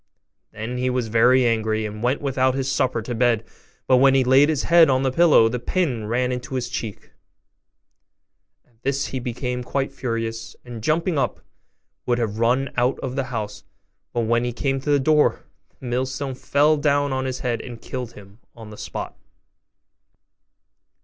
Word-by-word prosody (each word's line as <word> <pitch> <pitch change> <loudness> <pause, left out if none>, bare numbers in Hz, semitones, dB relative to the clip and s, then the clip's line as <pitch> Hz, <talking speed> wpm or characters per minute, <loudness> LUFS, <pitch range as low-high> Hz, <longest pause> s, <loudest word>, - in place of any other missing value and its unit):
Then 115 +4 -5
he 130 0 0
was 125 -3 -1
very 125 +3 +4
angry, 110 -1 0
and 105 0 -6
went 125 +4 0
without 130 -1 +1
his 135 0 -1
supper 125 -4 0
to 120 - -4
bed; 115 -2 +1 0.4
but 130 - +4
when 135 +1 +5
he 135 - +4
laid 135 +4 +5
his 155 -4 0
head 170 -2 +6
on 130 0 +2
the 130 - +1
pillow, 160 -6 +5
the 125 +2 -2
pin 125 - -1
ran 125 +3 0
into 125 +1 -4
his 125 -1 -2
cheek: 115 -4 -6 1.5
at 115 -2 -34
this 140 +1 -1
he 130 - -3
became 125 0 -4
quite 135 +2 -2
furious, 115 -2 -4
and, 120 -2 -8
jumping 160 - 0
up, - - -1 0.7
would 120 -1 +2
have 110 -2 -2
run 125 +4 +1
out 125 +2 +2
of 130 -1 -4
the 135 -2 -1
house; 110 -5 -5 0.5
but 120 - -1
when 115 +1 +1
he 120 - -1
came 135 +3 -2
to 150 - -5
the 145 -1 +4
door, 150 +2 +2 0.4
the - - -11
millstone 130 +3 -2
fell 145 +4 +2
down 145 -1 +1
on 130 0 -2
his 130 -1 -4
head, 120 -2 -1
and 120 -3 -9
killed 125 -2 -6
him 100 0 -15 0.2
on 110 -2 -11
the 105 - -11
spot. - - -6
125 Hz, 180 wpm, -22 LUFS, 115-135 Hz, 1.5 s, head